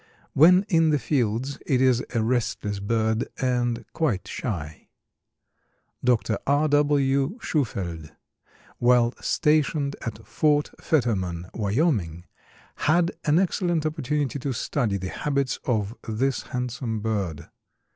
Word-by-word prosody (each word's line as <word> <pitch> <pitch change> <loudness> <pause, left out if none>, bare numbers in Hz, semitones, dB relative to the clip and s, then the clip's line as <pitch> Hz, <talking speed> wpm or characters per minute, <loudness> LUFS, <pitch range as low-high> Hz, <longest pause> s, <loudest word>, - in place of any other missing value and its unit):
When 180 +7 +6
in 165 -3 +3
the 150 - +3
fields 130 -1 -1
it 130 - +2
is 130 -1 +3
a 115 - +2
restless 110 -4 -1
bird 110 +2 0
and 120 -2 0
quite 130 - -1
shy. 80 -10 -5 1.2
Dr. 120 -3 +1
R. 145 +2 +3
W. 145 - +2
Shufeldt, 90 - -2 0.7
while 120 0 +4
stationed 150 -2 +1
at 110 -1 -6
Fort 150 +6 +1
Fetterman, 95 - -1
Wyoming, 100 - 0 0.6
had 170 +2 +3
an 150 0 +4
excellent 175 -3 +1
opportunity 150 -2 -1
to 135 0 -2
study 115 -3 -1
the 95 -1 -5
habits 140 0 -1
of 110 -3 -1
this 130 +5 0
handsome 125 -3 -3
bird. 100 -8 -3
125 Hz, 115 wpm, -25 LUFS, 110-145 Hz, 1.2 s, When